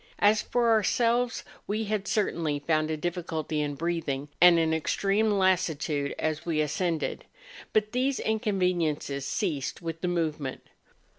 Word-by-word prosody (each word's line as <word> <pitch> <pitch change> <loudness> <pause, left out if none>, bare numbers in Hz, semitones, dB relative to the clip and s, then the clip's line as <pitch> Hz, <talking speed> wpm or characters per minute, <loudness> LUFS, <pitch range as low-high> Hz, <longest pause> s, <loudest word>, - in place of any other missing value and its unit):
As 210 +1 +4
for 240 -1 +1
ourselves, 235 +2 +2 0.2
we 215 +2 -1
had, 210 -1 -2
certainly, 165 -8 0
found 155 +1 0
a 155 - -1
difficulty 160 -2 -2
in 145 -1 -2
breathing, 150 -3 -2
and 175 -1 +8
an 160 -1 +2
extreme 195 +7 +1
lassitude 165 -7 +1
as 155 -1 -2
we 165 -3 -1
ascended; 155 +2 -1 0.5
but 215 0 +1
these 260 +2 0
inconveniences 180 - 0
ceased 160 - -2
with 165 -1 -5
the 180 - -1
movement. 155 -6 -2
170 Hz, 135 wpm, -28 LUFS, 155-205 Hz, 0.5 s, and